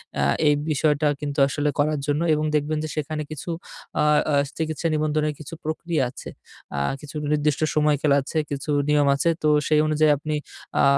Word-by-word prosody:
অ্যা 70 - +1 0.2
এই 150 - +6 0.2
বিষয়টা 150 0 +2
কিন্তু 145 -1 -3
আসলে 145 +2 -1
করার 150 0 +2
জন্য 145 +2 +1
এবং 155 0 0
দেখবেন 150 +1 0
যে 155 - -4
সেখানে 155 0 -3
কিছু 155 +3 -6 0.5
আ - - +3 0.3
আ - - +1 0.2
চিকিৎসা 160 +1 -2
নিবন্ধনের 155 0 0
কিছু 155 +1 -9
প্রক্রিয়া 160 0 -1
আছে, 130 - -9 0.5
আ - - +1 0.2
কিছু 150 0 -11 0.2
নির্দিষ্ট 150 0 +1
সময়কাল 150 -1 +2
আছে, 140 +4 -5
কিছু 140 +1 -4 0.2
নিয়ম 145 -1 +4
আছে। 170 +4 +1
তো - - +3 0.2
সেই 155 -1 +4
অনুযায়ী 155 0 +3
আপনি 150 +1 -3 0.5
আ - - +4
150 Hz, 175 wpm, -24 LUFS, 145-155 Hz, 0.5 s, এই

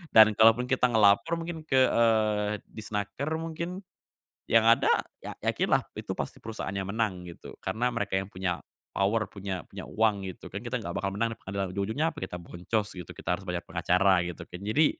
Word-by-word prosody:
dan 110 -1 +9
kalaupun 115 +3 +6
kita 130 -1 +4
ngelapor 110 +6 +4
mungkin 165 -1 -5
ke, - - +1
eee, 110 -2 +3 0.2
Disnaker 105 +5 -4
mungkin, 170 +3 -4 0.7
yang 115 -1 +6
ada 115 +1 +5 0.2
ya - - -7
yakinlah - - +2 0.2
itu - - -4
pasti - - -5
perusahaannya 100 -3 -4
menang 100 -4 -2
gitu 85 - -11
karena 110 +6 -1
mereka 115 -5 -2
yang 95 +1 -1
punya 90 -2 -2 0.3
power 105 +3 +2
punya 95 -3 -5
punya - - -8
uang 105 -2 +2
gitu 95 -2 -7
kan - - -4
kita - - -2
nggak - - -5
bakal 95 0 -1
menang 115 0 0
yang 115 - -30
ada 100 0 -1
ujung-ujungnya 125 +12 0
apa 150 - -9
kita 90 - -4
boncos 90 +5 -3
gitu 90 -2 -8
kita 90 - -2
harus 95 - -6
banyak 90 -2 -4
pengacara 95 0 +3
gitu 85 -1 -6
kan 90 - -9
jadi, 110 +10 +3
105 Hz, 185 wpm, -28 LUFS, 95-115 Hz, 0.7 s, dan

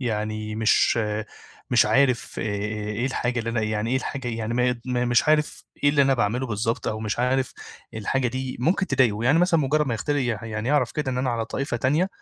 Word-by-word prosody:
يعني 110 -2 -3
مش 110 +1 +3 0.7
مش 120 -3 +5
عارف 125 +3 +2
إيه 105 +2 -2
الحاجة 125 -2 -1
اللي 115 0 -2
أنا 115 -1 0
يعني 110 +2 -1
إيه 130 - +2
الحاجة 130 -1 -4
يعني 115 0 -3
ما 125 0 +2
ي 125 -1 -2
ما 125 -1 0
مش 120 +5 +2
عارف 150 -1 +1 0.2
إيه - - +6
اللي 145 -1 +4
أنا 135 0 +3
باعملُه 120 +3 0
بالضبط 115 +1 -2
أو 110 - -3
مش 110 +1 -3
عارف 130 +1 +1 0.4
الحاجة 125 +4 0
دي 130 +1 -4
ممكن 190 +7 +1
تضايقه، 120 - +2
يعني 145 +6 +4
مثلًا 175 -2 +3
مُجرّد 150 +2 +1
ما 125 - -1
يختل 145 +6 -1
يح 120 -5 -1
يعني 110 +2 -4
يعرف 140 -4 +2
كده 150 -4 -2
إن 125 - -2
أنا 130 -1 0
على 115 -1 -1
طائفة 135 -3 -3
تانية، 150 +10 +1
125 Hz, 210 wpm, -24 LUFS, 110-135 Hz, 0.7 s, إيه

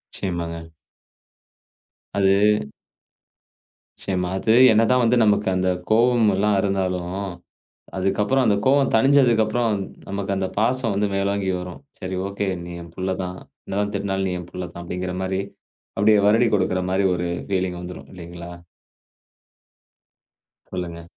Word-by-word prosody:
நிச்சயமாங்க. 85 -3 -4 1.4
அது 100 +2 +3 1.4
நிச்சயமா. 90 -2 -2
அது 110 +3 +2 0.2
என்னதான் 115 +3 +4
வந்து 120 +2 +3
நமக்கு 105 -1 +2
அந்தக் 90 -1 0
கோவமல்லாம் 110 -3 +3
இருந்தாலும், 95 -2 -1 0.8
அதுக்கப்புறம் 105 +8 +1
அந்தக் 100 -3 +1
கோவம் 140 0 +4
தணிஞ்சதுக்கப்புறம் 115 -3 +3 0.3
நமக்கு 100 0 -2
அந்தப் 95 0 -3
பாசம் 115 0 +1
வந்து 100 +1 +1
மேலோங்கி 100 0 0
வரும். 90 +4 -8 0.2
"சரி 95 -1 -4
ஓகே 100 0 -3 0.2
நீ 85 - -8
என் 85 -1 -13
புள்ள 95 0 -1
தான். 90 0 -5 0.3
என்னதான் 100 +1 -2
திட்டுனாலும் 95 -1 -1
நீ 90 - -2
என் 85 - -11
புள்ள 90 -1 -5
தான்." 85 - -8
அப்டீங்கிற 90 +1 -4
மாரி 95 0 -1 0.6
அப்படியே 105 +1 +4
வருடி 115 +3 +4
குடுக்கிற 95 -1 +1
மாரி 95 +1 +1
ஒரு 90 0 -2 0.2
ஃபீலிங் 95 -2 -1
வந்துரும் 90 0 -9
இல்லீங்களா? 85 -1 -9 2.2
சொல்லுங்க. 85 -2 -5
95 Hz, 120 wpm, -22 LUFS, 90-105 Hz, 2.2 s, என்னதான்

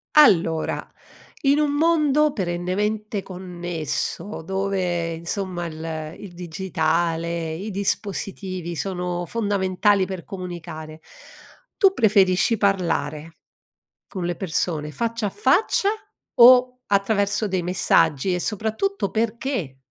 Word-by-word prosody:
Allora 170 - +4 0.6
in 280 +2 +4
un 295 -1 +2
mondo 300 -2 +3
perennemente 200 +2 -2
connesso, 175 +1 -4
dove 185 -3 -1
insomma 175 +1 -4
il 160 -1 -7
ehm, 160 -1 -5
il 200 -4 -9
digitale, 170 -1 -1
i 200 +6 -5
dispositivi 190 -3 -3
sono 180 -1 -3
fondamentali 200 -1 +1
per 185 -2 -6
comunicare, 165 -4 -8 0.8
tu 390 -3 +5
preferisci 205 - +3
parlare, 165 -6 0 0.8
con 185 -5 -5
le 175 0 -1
persone, 160 -3 -2
faccia 230 - -2
a - - -1
faccia 385 - +2 0.5
o 250 +1 +7
attraverso 200 +1 +1
dei 185 -2 -1
messaggi 170 -2 +2
e - - -2
soprattutto 220 - -1
perché? 225 - -2
185 Hz, 105 wpm, -23 LUFS, 170-215 Hz, 0.8 s, o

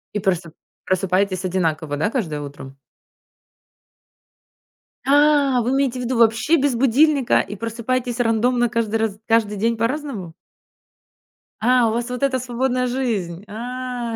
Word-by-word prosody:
И - - +1
просто, 180 -4 -1 0.3
просыпаетесь 185 0 0
одинаково, 160 -5 -1
да, 160 +8 0
каждое 160 - -3
утро? 140 -1 -9 2.3
А, 285 -2 +4
вы 245 +3 -1
имеете 270 -2 0
в - - -3
виду 245 0 -1
вообще 230 +7 +3
без 280 -3 +1
будильника 270 +2 +3
и 205 - -3
просыпаетесь 240 +3 -3
рандомно 240 +1 +2
каждый 230 -2 -1
раз 215 -2 -2
каждый 220 -2 +2
день 230 +3 0
по-разному? 230 - -3 1.3
А, 240 0 +3
у - - -2
вас 240 +1 -2
вот 250 +1 -5
эта 260 -2 +1
свободная 250 +1 -1
жизнь! 210 -9 -2
А. 245 +1 -5
230 Hz, 130 wpm, -21 LUFS, 200-255 Hz, 2.3 s, А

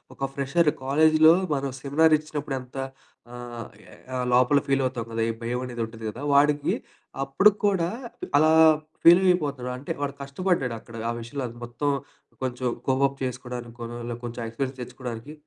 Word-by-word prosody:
ఒక 135 0 -3
ఫ్రెషర్ 145 +3 +2
కాలేజీలో 155 +3 +6 0.2
మనం 135 -1 -2
సెమినార్ 155 +3 +4
ఇచ్చినప్పుడు 150 -3 -4
ఎంత 125 +1 -12 0.6
ఆహ్, 120 -2 -8 0.6
లోపల 125 +3 +5
ఫీలవుతాం 130 -4 0
గదా! 115 0 -2
ఈ - - +1
భయం 120 +2 -2
అనేది 120 -2 -5
ఉంటది 110 0 -11
కదా 115 +5 -8
వాడికి 145 +1 +3 0.5
అప్పుడు 135 +10 +5 0.2
కూడా 190 -5 +2 0.5
అలా 155 +1 +5 0.5
ఫీలయిపోతాడు. 170 -7 +4
అంటే 135 - -6
వాడు 140 -1 -1
కష్టపడ్డాడు 140 -3 -1
అక్కడ 115 - -14
ఆ - - +1
విషయంలో 120 +4 -5 0.2
మొత్తం 120 +5 -2 0.5
కొంచెం 125 0 -2 0.2
కోప్అప్ 135 +1 +2
చేసుకోవడానికి 125 -2 -5 0.5
కొంచెం 120 0 -5
ఎక్స్‌పీరియన్స్ 130 +3 -4
తెచ్చుకోడానికి. 125 +2 -7
135 Hz, 130 wpm, -25 LUFS, 120-150 Hz, 0.6 s, కాలేజీలో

